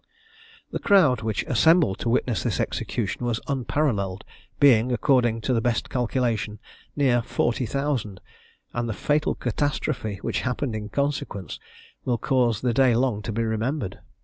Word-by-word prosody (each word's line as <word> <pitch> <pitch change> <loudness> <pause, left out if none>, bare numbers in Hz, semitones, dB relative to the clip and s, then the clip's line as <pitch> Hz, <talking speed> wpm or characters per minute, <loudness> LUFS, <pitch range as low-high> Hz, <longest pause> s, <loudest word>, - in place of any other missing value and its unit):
The - - -3
crowd 150 - +4
which 110 -1 -1
assembled 155 - +3
to 115 - -1
witness 120 -1 +1
this - - -1
execution - - -2
was 120 -2 0
unparalleled, 120 -8 -1 0.4
being, 125 -4 +5
according 120 -3 +2
to 130 - 0
the 115 - +2
best 115 0 -1
calculation, 120 -4 -1 0.4
near 130 -4 +3
40,000; 120 -3 -1 0.5
and 120 -1 -2
the - - -1
fatal 150 +8 0
catastrophe, 125 -3 -2
which - - -1
happened 125 -1 -2
in 105 -1 -5
consequence, 140 - -3 0.4
will 125 -2 0
cause 120 -3 +1
the 125 -2 +1
day 130 -2 +4
long 120 -4 +1
to 115 - -4
be 115 +2 -1
remembered. 110 +1 -2
120 Hz, 145 wpm, -25 LUFS, 110-135 Hz, 0.5 s, being